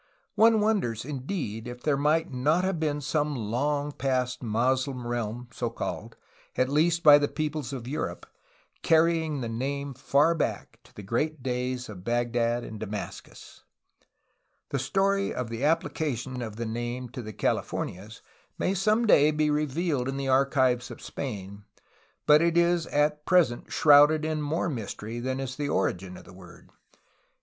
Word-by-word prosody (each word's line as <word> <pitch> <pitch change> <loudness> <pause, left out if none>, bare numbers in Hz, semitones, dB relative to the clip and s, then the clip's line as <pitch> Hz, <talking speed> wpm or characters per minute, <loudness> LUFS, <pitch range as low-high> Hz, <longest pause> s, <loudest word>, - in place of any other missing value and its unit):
One 225 0 +5
wonders, 190 - 0
indeed, 130 - -4
if 125 0 -8
there 150 -2 +2
might 150 +1 +1
not 150 +8 +2
have 190 -3 -1
been 150 -2 -1
some 150 +1 -1
long 140 +6 -1
past 125 -3 -1
Moslem 125 +3 0
realm 120 0 -3
so 120 -1 -3
called, 115 - -5 0.4
at 130 0 +1
least 165 +4 +2
by 145 -1 +9
the 145 - +1
peoples 150 -4 -3
of 125 -3 -6
Europe, 150 +4 -4 0.6
carrying 160 -3 +2
the 120 - -3
name 140 +4 -3
far 140 +5 +2
back 165 - -3
to - - -22
the 105 - -9
great 140 +7 -2
days 125 0 -2
of 95 -4 -10
Bagdad 120 +1 0
and 110 - -8
Damascus. 105 0 -8 1.1
The 140 - -1
story 195 +9 +1
of 120 -2 -4
the 115 +3 -4
application 140 -5 -1
of 110 -3 -5
the 115 +1 -4
name 120 +2 -4
to 125 - -7
the 110 -2 -7
Califor - - -1
nias 100 +5 -11 0.4
may 185 - 0
some 215 +5 +2
day 150 -8 +6
be 155 0 +1
revealed 150 -2 -1
in 135 - -3
the 135 -1 -2
archives 130 -2 +2
of - - -9
Spain, 100 -6 -6 0.6
but 150 +1 +6
it 170 0 +2
is 170 -1 +2
at 150 +1 +1
present 170 -10 +2
shrouded 150 +1 +6
in 155 -1 -1
more 155 +4 -1
mystery 115 -4 -5
than 130 +2 -2
is 130 -1 -4
the 145 -1 -2
origin 95 -3 -1
of - - -13
the - - -15
word. 90 -1 -15
135 Hz, 160 wpm, -27 LUFS, 120-155 Hz, 1.1 s, by